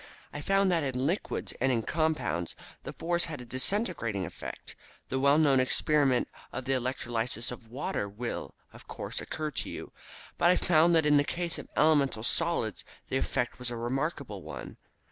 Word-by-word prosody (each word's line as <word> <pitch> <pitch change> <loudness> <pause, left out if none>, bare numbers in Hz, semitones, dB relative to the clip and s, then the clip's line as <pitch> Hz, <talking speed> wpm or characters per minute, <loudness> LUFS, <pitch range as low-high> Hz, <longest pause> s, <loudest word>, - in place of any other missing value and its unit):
I 145 - -4
found 195 +3 +3
that 170 -2 +3
in 130 -2 -1
liquids, 175 +7 -1
and 135 +1 +4
in 115 -3 +1
compounds, 150 - 0 0.3
the - - -6
force 170 +1 +1
had 155 -4 -5
a 125 - -8
disintegrating 130 - 0
effect. - - -8 0.3
The 130 - 0
well 140 +2 +5
known 145 -4 +5
experiment 135 0 +3 0.2
of 130 - -5
the 135 - +1
electrolysis 120 -2 -1
of 120 -2 -9
water 130 - -2
will, 115 +4 -5 0.2
of - - -14
course, - - -4
occur 155 -1 -3
to - - -3
you. - - -7 0.5
But 175 - +5
I 180 - +6
found 170 -1 +4
that 160 -2 +4
in 150 -1 +6
the 145 - +5
case 170 +2 -2
of - - -8
elemental 145 -7 +4
solids 145 - 0 0.3
the - - +1
effect 125 +1 -1
was 125 -1 -2
a 120 - -4
remarkable 130 - -2
one. 70 -6 -8
135 Hz, 180 wpm, -30 LUFS, 120-160 Hz, 0.5 s, I